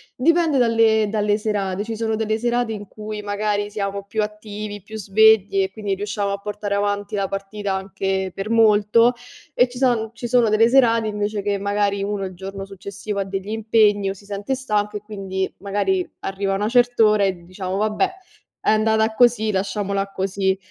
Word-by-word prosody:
Dipende 325 +1 +3
dalle 225 -3 +3
dalle 210 -1 +1
serate, 205 -2 -2
ci 225 +1 -5
sono 220 0 -1
delle 220 0 -1
serate 240 -1 0
in 205 -2 -7
cui 215 0 -7
magari 205 0 -1
siamo 200 -1 -3
più 215 +1 -1
attivi, 210 -1 -6
più 220 +3 -9
svegli 205 -1 +4
e 190 0 -1
quindi 205 -1 -3
riusciamo 205 0 -2
a 200 - -1
portare 205 0 -4
avanti 205 0 -1
la 195 -1 0
partita 195 +1 -4
anche 190 -1 -2
per 195 +2 -5
molto, 225 +1 +4 0.4
e 245 - +4
ci 245 - -10
son 240 -4 +1
ci 240 - -7
sono 235 -2 +3
delle 220 +2 +4
serate 235 -3 +4
invece 210 -1 -2
che 200 0 0
magari 200 0 0
uno 200 -1 -2
il 185 - -6
giorno 195 +2 -7
successivo 200 +1 -6
ha - - +1
degli 195 +1 -5
impegni 215 -2 +2
o - - -2
si 200 - -17
sente 205 +5 -3
stanco 210 -5 -1
e 205 - -9
quindi 195 -3 -4
magari 195 -2 -1
arriva 195 0 -2
una 205 +2 -1
cert'ora 230 -4 +4
e 185 -3 -1
diciamo: 185 +1 -4
"Vabbè, 215 - +1 0.5
è - - 0
andata 220 0 +2
così, 235 -2 +3
lasciamola 200 0 -2
così." 190 0 0
205 Hz, 180 wpm, -21 LUFS, 195-220 Hz, 0.5 s, svegli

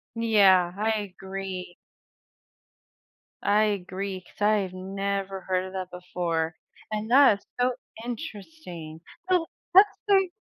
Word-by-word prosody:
Yeah, 195 -6 +5
I 220 +1 +1
agree. 190 -1 -6 1.7
I 210 +1 +4
agree, 195 -1 -3
'cause - - -22
I 210 +1 +4
have 190 -3 -2
never 195 +1 -3
heard 185 0 -1
of 190 - -9
that 185 -1 -4
before. 170 -2 -2 0.4
And 215 +1 -3
that 260 -6 +6
is - - -29
so 250 0 +3 0.3
interesting. 200 - -7 0.3
Oh, 345 -3 +3 0.2
what 385 +4 +9 0.2
state 385 -4 +3
195 Hz, 120 wpm, -26 LUFS, 185-220 Hz, 1.7 s, what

